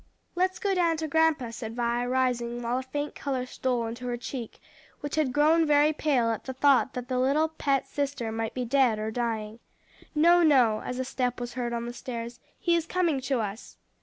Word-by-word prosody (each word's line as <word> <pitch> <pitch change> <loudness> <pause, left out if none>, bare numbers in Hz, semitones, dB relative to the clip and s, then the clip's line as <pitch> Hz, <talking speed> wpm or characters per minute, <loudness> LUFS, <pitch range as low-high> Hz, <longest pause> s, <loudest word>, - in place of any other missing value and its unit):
"Let's 370 +1 0
go 400 -4 0
down 340 -3 +2
to 315 0 -3
grandpa," 310 -5 +2
said 225 -1 -6
Vi, 240 0 0
rising, 245 -2 0
while 240 +2 0
a - - -3
faint 290 +3 -4
color 265 -3 -3
stole 250 -2 -1
into 235 +2 -6
her 240 -1 -2
cheek, 240 -1 -7 0.4
which 290 0 -5
had 310 -4 +1
grown 310 +5 +4
very 300 0 +4
pale 265 -7 +1
at 225 - -4
the 260 - -4
thought 265 -1 +3
that 250 -1 -5
the 255 -1 -1
little 290 +5 +2
pet 280 -4 0
sister 280 -5 -3
might 225 0 -3
be 250 -1 -2
dead 250 -3 +3
or 215 +1 -3
dying. 225 -2 -3 0.6
"No, 340 +3 +5
no," 255 -9 +4
as 250 - -4
a 260 - -2
step 250 -1 -2
was 240 -1 -5
heard 245 -1 -3
on 235 0 -3
the 240 - -5
stairs, 235 -1 -6 0.2
"he 345 -1 +2
is 335 -1 -1
coming 335 -7 +1
to 260 -2 0
us." 210 +1 -6
255 Hz, 210 wpm, -27 LUFS, 235-295 Hz, 0.6 s, No